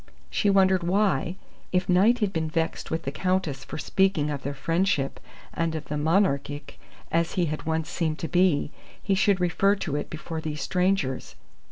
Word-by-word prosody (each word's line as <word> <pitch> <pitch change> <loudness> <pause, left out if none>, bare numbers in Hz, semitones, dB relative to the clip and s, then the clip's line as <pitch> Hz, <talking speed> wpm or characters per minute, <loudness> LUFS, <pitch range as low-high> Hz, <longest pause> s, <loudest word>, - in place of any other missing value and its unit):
She 205 - +2
wondered 190 -1 +4
why, 180 -2 +1 0.4
if 180 0 +1
Knight 195 +7 +4
had 195 - -5
been 160 -2 -1
vexed 165 +1 -2
with 160 +1 -2
the 135 - -3
Countess 175 -5 -1
for - - -7
speaking 170 -4 +1
of 140 -2 -4
their 140 +1 -4
friendship 165 -2 0 0.3
and 165 -1 -1
of 155 -2 -6
the 150 - -2
Monarchic, 145 -3 0 0.3
as 165 0 +1
he 180 - +1
had 155 0 -4
once 160 0 0
seemed 160 -3 -1
to 165 - -4
be, 175 -2 +2 0.3
he 195 - 0
should 195 0 +3
refer 195 +3 +3
to 160 -7 -3
it 145 - -3
before 160 0 -5
these 150 -2 -4
strangers. 180 -8 0
165 Hz, 180 wpm, -26 LUFS, 150-190 Hz, 0.4 s, wondered